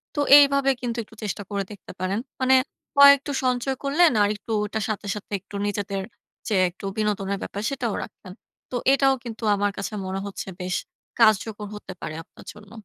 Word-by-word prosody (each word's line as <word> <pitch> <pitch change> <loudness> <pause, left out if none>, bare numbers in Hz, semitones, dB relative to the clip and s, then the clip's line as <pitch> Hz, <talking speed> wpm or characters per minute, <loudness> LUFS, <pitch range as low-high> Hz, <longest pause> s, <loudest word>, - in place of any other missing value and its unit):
তো - - -2 0.2
এইভাবে 280 -1 +5
কিন্তু 240 -1 -3
একটু 220 - -18
চেষ্টা 205 -1 -3
করে 200 -1 -1
দেখতে 200 -4 -11
পারেন। 185 +3 -1 0.2
মানে 260 0 +5 0.4
কয়েকটু 280 0 +7
সঞ্চয় 255 +1 0
করলেন 310 +5 +4
আর 205 - +4
একটু 210 +2 -9 0.2
এটার 220 +1 -3
সাথে, 210 -1 -3
সাথে 210 - -9
একটু 200 +2 -13
নিজেদের 200 -1 -2 0.5
যে 220 - -1 0.2
একটু 180 +3 -11
বিনোদনের 200 -2 -1
ব্যাপার 200 - -5
সেটাও 250 -6 -2
রাখছেন। 185 - -12 0.4
তো - - -3 0.2
এটাও 270 -1 +4
কিন্তু 230 -1 -8
আমার 205 0 0
কাছে 200 +2 -4
মনে 190 +1 -3
হচ্ছে 200 -1 -6
বেশ 180 0 -2 0.4
কার্যকর 215 -1 +3
হতে 210 -2 -8
পারে 155 - -5
আপনার - - -17
জন্য। 205 0 -16
210 Hz, 180 wpm, -24 LUFS, 200-255 Hz, 0.5 s, কয়েকটু